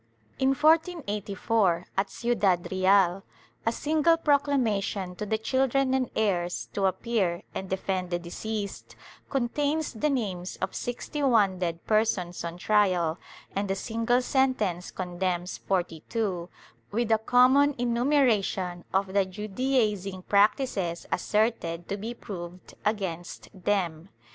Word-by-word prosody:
In 270 +1 +3
1484, 225 - +1
at 195 +1 0
Ciudad 205 -8 0
Real, 190 0 +3 0.5
a - - +4
single 315 +6 +2
proclamation 240 - +1
to 210 - -4
the 220 - +1
children 265 +3 +1
and 260 -1 +1
heirs, 180 -5 0
to 195 -1 +2
appear 190 -2 -1
and 190 - -5
defend 190 -1 -2
the 175 - 0
deceased, 200 +4 -5 0.3
con 255 -4 0
tains 290 -3 -1
the 300 - +3
names 195 -9 -2
of 190 - -3
sixty 245 +5 -4
one 210 -9 +3
dead 170 -2 -3
persons 215 -5 +1
on 170 0 -5
trial 180 -5 +2 0.4
and 200 0 -1
a 195 - +1
single 230 +4 0
sentence 220 -10 +1
condemns 180 0 -3
forty 175 -4 -2
two, 190 -7 -2 0.4
with 230 +2 -1
a 220 - +5
common 260 +5 +5
enumeration 235 -8 +1
of 190 0 0
the 200 -1 +4
Judaizing 205 -1 -1
practices 200 -4 +1
asserted 210 -6 0
to 200 - -2
be 225 +4 -5
proved 180 -4 -8
against 190 -5 -3
them. 185 -3 -1
205 Hz, 125 wpm, -27 LUFS, 185-245 Hz, 0.5 s, a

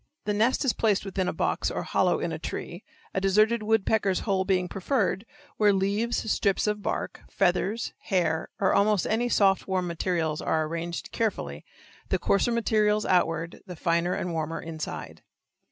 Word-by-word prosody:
The 210 - 0
nest 230 +7 +2
is 255 - +3
placed 210 -3 +1
within 190 -1 -2
a - - +1
box - - 0
or - - -3
hollow - - +1
in - - -2
a - - -4
tree, - - -6 0.3
a 190 - 0
deserted 215 +4 +3
woodpecker's 215 -2 +1
hole 190 -3 0
being 185 -2 +1
preferred, 195 +1 -1 0.3
where 210 -1 +5
leaves, 205 +3 0
strips 200 -2 +1
of 210 0 -1
bark, - - -3
feathers, 195 +4 0
hair, 165 -4 0
or 190 - +3
almost 205 -1 +3
any 235 +3 0
soft, 195 -4 +3
warm 185 -1 0
materials 170 -2 -1
are 160 -1 +1
arranged 170 +2 -5
carefully, 80 - -2 0.5
the - - +2
coarser 200 +4 +2
material 215 -2 +2
outward, 165 -2 +1
the 180 - -7
finer 170 +2 +1
and 175 - -3
warmer 160 0 -2
inside. 160 -1 -6
195 Hz, 165 wpm, -27 LUFS, 175-215 Hz, 0.5 s, where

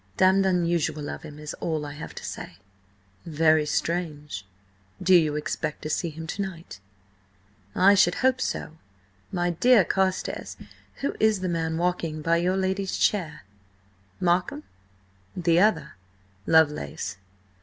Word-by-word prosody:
Damned 190 +1 +4
unusual 170 -5 0
of - - -7
him 150 -2 -10
is 150 0 -6
all 155 -3 -2
I 145 - -6
have 150 +2 -9
to - - -7
say." 85 - -7 0.7
"Very 155 -1 +2
strange. 150 - -3 0.5
Do 185 0 +3
you 155 -4 +5
expect 150 0 -3
to 155 - -3
see 170 - -1
him 160 +1 -8
to 180 +5 -4
night?" 170 - -7 1.0
"I 195 +2 +6
should 180 -3 +4
hope 260 0 +2
so! 160 - -3 0.5
My 175 -1 0
dear 220 +3 +5
Carstares, 190 0 -1 0.4
who 280 - -1
is 215 -3 +3
the 185 - -1
man 160 -1 -1
walking 165 -3 -1
by 165 +1 +3
your 180 +3 +1
lady's 190 0 -1
chair?" 180 -7 0 0.8
"Markham?" 175 -3 0 0.7
"The 170 -1 +3
other." 215 +3 +2 0.6
"Lovelace." 150 - +2
170 Hz, 135 wpm, -26 LUFS, 155-185 Hz, 1.0 s, I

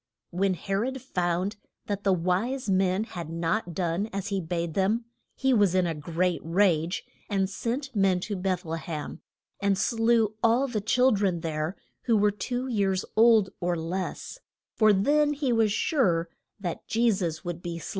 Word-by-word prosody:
When 185 +1 +1
He 195 +4 -5
rod 255 +7 -1
found 185 -3 -1 0.3
that 205 -1 -3
the 195 - +3
wise 185 +10 0
men 190 +1 +2
had 175 -8 -7
not 170 +2 -2
done 180 +4 -1
as 200 +1 -4
he 195 -2 -1
bade 170 -1 -3
them, 210 +6 +1 0.3
he 265 0 +2
was 205 -5 +3
in 185 -1 +3
a 165 - -1
great 170 +3 -1
rage, 170 -1 +1 0.2
and 195 -2 +1
sent 245 +7 -4
men 195 -3 +3
to 205 - -3
Beth 185 -1 -2
le 165 0 -3
hem, 155 -1 -6 0.4
and 200 -1 +1
slew 225 0 +2
all 235 +4 +3
the 225 -5 -2
chil 250 +5 +3
dren 195 -5 +1
there 160 +2 -2 0.3
who 230 -3 +3
were 205 0 +3
two 245 +6 -3
years 195 -6 0
old 220 -3 +5
or 175 -1 0
less, 180 - -4 0.3
for 215 -1 +5
then 290 +9 +3
he 275 -4 0
was 225 -2 +3
sure 185 - +1 0.3
that 175 -4 -5
Je 230 +1 +3
sus 170 -6 -2
would 175 -1 -4
be 170 -1 -5
slain. 165 - -7
195 Hz, 175 wpm, -27 LUFS, 175-225 Hz, 0.4 s, old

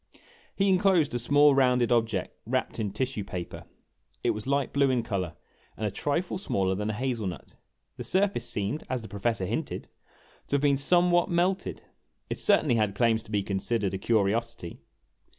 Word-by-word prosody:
He 195 - +2
inclosed 185 -6 +3
a 120 - 0
small 145 +4 +5
rounded 125 -3 +3
object 115 -6 0
wrapped - - -1
in 105 -2 -1
tissue 125 0 -2
paper. 90 -3 -7 0.6
It - - +3
was 105 +3 -5
light 140 0 0
blue 140 -1 +3
in 125 -3 +1
color 95 -7 -3 0.4
and 110 - -2
a 105 - -1
trifle 165 - -2
smaller 95 - 0
than 105 +3 -2
a - - -1
hazel 120 -2 -2
nut. 90 - -8 0.4
The - - -5
surface 195 +1 0
seemed, 105 +9 -2
as 130 -2 -2
the - - -7
Professor 100 0 -1
hinted, - - -4 0.6
to - - 0
have 140 - +1
been 145 -1 +4
some 175 +6 +3
what 175 +1 +3
melted. 180 +2 0 0.5
It - - -2
certainly 155 - +3
had 105 -2 +1
claims 115 +1 +2
to 110 - -14
be 100 -2 +1
considered 100 +1 -1
a 95 - -3
curiosity. 110 -3 0
120 Hz, 180 wpm, -28 LUFS, 105-145 Hz, 0.6 s, small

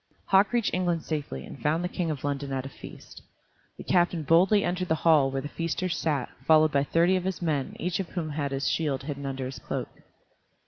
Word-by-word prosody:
Hauk 195 +1 +4
reached 240 -3 +1
England 175 -3 0
safely, 145 - -4
and - - -11
found 160 +4 +1
the - - 0
King 180 -2 -2
in 155 - -1
London 140 -1 -2
at 135 -1 -2
a - - -5
feast. - - -12 0.6
The - - -8
captain 175 -2 +2
boldly 185 +7 +4
entered 180 +1 -1
the 160 - +2
hall 150 -5 +5
where 135 0 -2
the - - -4
feasters 170 +3 -2
sat, 145 -6 -1 0.2
followed 155 +1 +5
by 140 -1 +2
thirty 170 +5 +3
of 185 - -1
his 190 -1 -2
men, 150 -6 -1
each 180 0 -1
one 190 - -2
of - - -19
whom 165 -3 -2
had 145 -1 -2
his 135 0 -1
shield 145 -5 0
hidden 140 -1 -5
under 135 -1 -3
his 130 +1 -6
cloak. - - -4
160 Hz, 225 wpm, -27 LUFS, 140-175 Hz, 0.6 s, hall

